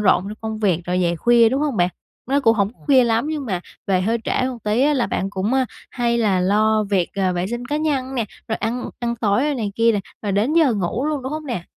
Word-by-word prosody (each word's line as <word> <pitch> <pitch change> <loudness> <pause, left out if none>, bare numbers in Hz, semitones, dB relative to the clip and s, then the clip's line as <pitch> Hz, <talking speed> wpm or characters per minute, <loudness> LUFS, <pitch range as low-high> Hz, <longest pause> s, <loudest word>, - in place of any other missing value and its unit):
rộn 190 -3 +4
trong 210 - -6
công 220 -1 -4
việc 190 -6 +1
rồi 180 +1 0
về 170 -1 +1
khuya, 235 +4 +5
đúng 265 +4 -1
hông 295 -5 -1
bạn? 175 -1 +3 0.4
Nó 275 +3 +2
cũng 225 -4 +4
hổng 200 +1 +1
có - - -33
khuya 265 -3 +5
lắm 230 +3 +1
nhưng 300 -3 -3
mà 185 -5 -2 0.3
về 190 -2 +2
hơi 225 +5 0
trễ - - -2 0.2
một 250 -2 -6
tí 210 +3 +1
á 295 +1 +3
là 250 -4 +1
bạn 195 - -2
cũng, 200 +3 -2
a, 265 -1 +2 0.2
hay 235 -1 0
là 200 -5 +2
lo 215 +3 +2
việc, 185 -4 +2
ờ, 190 -2 +1
vệ 175 +1 -1
sinh 240 +4 -4
cá 290 +3 -1
nhân 275 -4 -1
nè, 235 -4 0 0.2
rồi 220 - -1
ăn 240 +3 -3
ăn 235 -1 -2
tối 235 +7 +1
này 215 -6 -3
kia 230 0 +3
nè, 205 - 0 0.2
rồi 205 -2 -1
đến 210 +9 +1
giờ 315 -6 +4
ngủ 205 +6 -2
luôn, 300 -3 -2
đúng 265 +3 -4
không 310 0 -5
nè? 230 -10 -3
225 Hz, 270 wpm, -21 LUFS, 200-260 Hz, 0.4 s, khuya